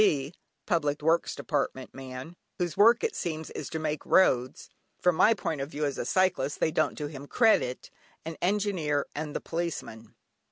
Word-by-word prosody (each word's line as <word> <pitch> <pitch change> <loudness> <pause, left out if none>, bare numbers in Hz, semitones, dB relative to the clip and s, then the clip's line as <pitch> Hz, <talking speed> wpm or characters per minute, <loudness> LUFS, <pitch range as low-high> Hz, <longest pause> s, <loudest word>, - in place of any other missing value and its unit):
(Public 150 -3 0
Works 165 +2 +2
Department) 135 -3 -2
man, 130 +4 -8 0.2
whose 175 -4 -2
work, 225 +4 +5
it 460 -2 0
seems, 160 -2 -4
is - - -6
to 160 - -3
make 155 -1 -2
roads 130 -9 +2 0.3
(from 180 -2 +3
my 225 +7 +5
point 165 -6 -3
of 135 - -4
view 150 -1 -2
as 140 -3 -2
a - - -2
cyclist 180 -5 +1
they 160 - +2
don't 165 - 0
do 150 - -3
him 145 -1 -8
credit), 220 - +2 0.3
an 165 0 -5
Engineer, 180 -7 0
and 150 0 -5
the - - -2
Policeman. 115 -10 -5
155 Hz, 170 wpm, -28 LUFS, 140-175 Hz, 0.3 s, work